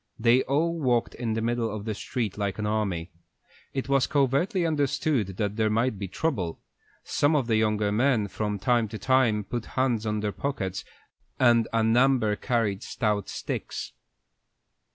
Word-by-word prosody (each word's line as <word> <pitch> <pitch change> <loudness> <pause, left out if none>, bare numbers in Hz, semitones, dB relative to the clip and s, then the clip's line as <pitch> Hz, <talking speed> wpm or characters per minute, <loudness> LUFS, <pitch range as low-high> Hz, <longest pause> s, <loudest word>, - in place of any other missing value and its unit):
They 120 +2 +4
all 165 +5 0
walked 125 -5 +1
in 115 -2 -3
the 110 0 -1
middle 120 -1 0
of 105 -1 -5
the 110 - -2
street 110 -1 -3
like 100 -2 -2
an 105 - -2
army. 100 -6 -1 0.6
It 135 -1 -3
was 135 -1 +3
covertly 150 - +1
understood 140 - 0
that 105 0 -2
there 110 -1 +2
might 115 0 0
be 100 - -3
trouble. 95 - -2 0.4
Some 145 +2 +2
of 140 -4 +2
the 115 -1 +1
younger 105 -1 +1
men 115 -1 +2
from 105 0 -3
time 115 +3 +2
to 110 +1 -7
time 120 -4 +2
put 120 +3 -5
hands 120 -4 +1
on 105 0 -1
their 105 -1 -1
pockets, 95 -8 -3 0.6
and 120 -2 +4
a 115 -1 +2
number 120 -1 +3
carried 110 -5 -1
stout 105 -3 -1
sticks. - - -5
115 Hz, 165 wpm, -26 LUFS, 105-130 Hz, 0.6 s, They